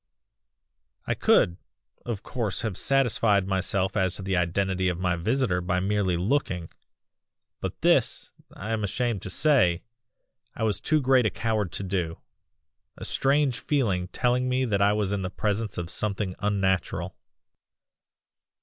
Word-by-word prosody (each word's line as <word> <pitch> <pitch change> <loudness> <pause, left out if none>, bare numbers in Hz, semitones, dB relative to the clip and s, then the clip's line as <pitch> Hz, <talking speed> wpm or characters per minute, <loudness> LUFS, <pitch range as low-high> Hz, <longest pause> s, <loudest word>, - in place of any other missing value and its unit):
"I - - 0
could, 85 0 +3 0.5
of 110 -4 -3
course 115 -7 -2
have 110 -5 -3
satisfied 115 -7 +3
myself 95 0 0
as 95 -3 +1
to 95 - -6
the 95 0 -1
identity 95 +2 0
of 90 - -2
my 90 -1 +1
visitor 95 +1 0
by 90 0 0
merely 95 -2 0
looking, 90 - -1 0.9
but - - -5
this, - - +2 0.2
I 105 +3 -6
am 110 -1 -1
ashamed 115 0 -1
to - - -4
say, 110 - +3 0.7
I - - -3
was 110 -2 0
too 155 -1 +1
great 130 -3 +4
a - - +1
coward 110 -6 -1
to - - -3
do; 90 -4 -2 0.8
a - - -7
strange 135 -2 +1
feeling 105 -12 0
telling 125 +5 0
me 130 +1 +1
that 100 -4 0
I 100 +1 +5
was 105 -2 0
in 100 -1 -1
the 90 - -3
presence 105 +2 -2
of 85 -1 -4
something 100 -2 -1
unnatural. 95 -3 -1
100 Hz, 150 wpm, -26 LUFS, 95-115 Hz, 0.9 s, I